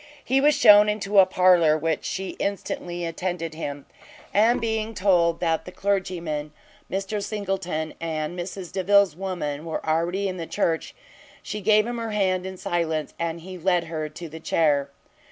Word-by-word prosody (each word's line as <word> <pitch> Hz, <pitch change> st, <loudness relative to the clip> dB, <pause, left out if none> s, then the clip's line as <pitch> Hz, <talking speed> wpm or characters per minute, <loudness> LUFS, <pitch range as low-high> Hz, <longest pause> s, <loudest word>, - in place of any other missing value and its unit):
He 265 Hz, +2 st, +2 dB
was 295 Hz, +1 st, +4 dB
shewn 210 Hz, 0 st, +7 dB
into 205 Hz, -1 st, +2 dB
a 190 Hz, -, +7 dB
parlour, 180 Hz, -4 st, +4 dB
where 160 Hz, 0 st, 0 dB
she 190 Hz, 0 st, -4 dB
instantly 175 Hz, -3 st, -3 dB
attended 165 Hz, -1 st, -3 dB
him; 145 Hz, -3 st, -6 dB, 0.5 s
and 225 Hz, +4 st, +4 dB
being 220 Hz, -1 st, -2 dB
told 175 Hz, -4 st, +3 dB
that 165 Hz, -2 st, 0 dB
the 180 Hz, -, -8 dB
clergyman, 175 Hz, -7 st, -2 dB, 0.4 s
Mr 195 Hz, +2 st, -2 dB
Singleton, 190 Hz, -7 st, -3 dB
and 160 Hz, 0 st, -3 dB
Mrs 180 Hz, 0 st, -6 dB
Delvile's 195 Hz, -2 st, +3 dB
woman, 170 Hz, -6 st, -4 dB
were 160 Hz, -1 st, -5 dB
already 170 Hz, +5 st, 0 dB
in 185 Hz, -1 st, -4 dB
the 165 Hz, -2 st, -5 dB
church, 165 Hz, -5 st, -1 dB, 0.5 s
she 210 Hz, -, -5 dB
gave 210 Hz, +1 st, +4 dB
him 240 Hz, 0 st, -4 dB
her 225 Hz, -2 st, -4 dB
hand 185 Hz, -3 st, 0 dB
in 190 Hz, 0 st, -7 dB
silence, 160 Hz, -4 st, -2 dB
and 170 Hz, 0 st, -3 dB
he 185 Hz, +1 st, -9 dB
led 180 Hz, 0 st, +2 dB
her 160 Hz, -2 st, -4 dB
to 170 Hz, +2 st, -8 dB
the 160 Hz, +1 st, -9 dB
chair. 145 Hz, -3 st, +1 dB
180 Hz, 165 wpm, -24 LUFS, 160-200 Hz, 0.5 s, shewn